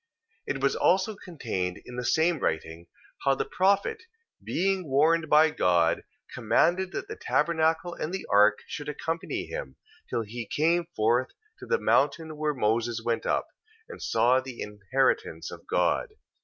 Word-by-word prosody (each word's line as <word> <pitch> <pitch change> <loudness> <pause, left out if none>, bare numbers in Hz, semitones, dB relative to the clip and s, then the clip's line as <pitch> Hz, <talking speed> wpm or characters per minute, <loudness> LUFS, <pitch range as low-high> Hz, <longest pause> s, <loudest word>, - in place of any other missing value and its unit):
2:4. - - 0
It - - -6
was - - +2
also 195 +3 +2
contained 110 - -4
in 125 - -9
the 125 - -3
same 160 +5 +2
writing, 80 -1 -3 0.4
how 135 0 +3
the - - -2
prophet, 200 - +1 0.4
being 190 -3 -1
warned 155 +3 +3
by 155 +1 +6
God, 85 - +2 0.3
commanded 185 +2 +2
that 390 - -5
the 435 - -6
tabernacle 160 +2 +1
and 155 - -4
the 190 - -4
ark 105 0 +4
should 145 0 -6
accompany 165 +3 -3
him, - - -6 0.3
till 115 - -1
he 115 +1 -7
came 165 +3 +1
forth 120 +4 +2 0.3
to - - -10
the 475 - +2
mountain 155 +3 +1
where 150 -1 -1
Moses 115 0 0
went 115 -1 -1
up, - - +1 0.4
and - - -10
saw 125 +2 +3
the 130 -2 -8
inheritance 105 -4 -1
of - - -11
God. - - +1
150 Hz, 155 wpm, -27 LUFS, 115-170 Hz, 0.4 s, by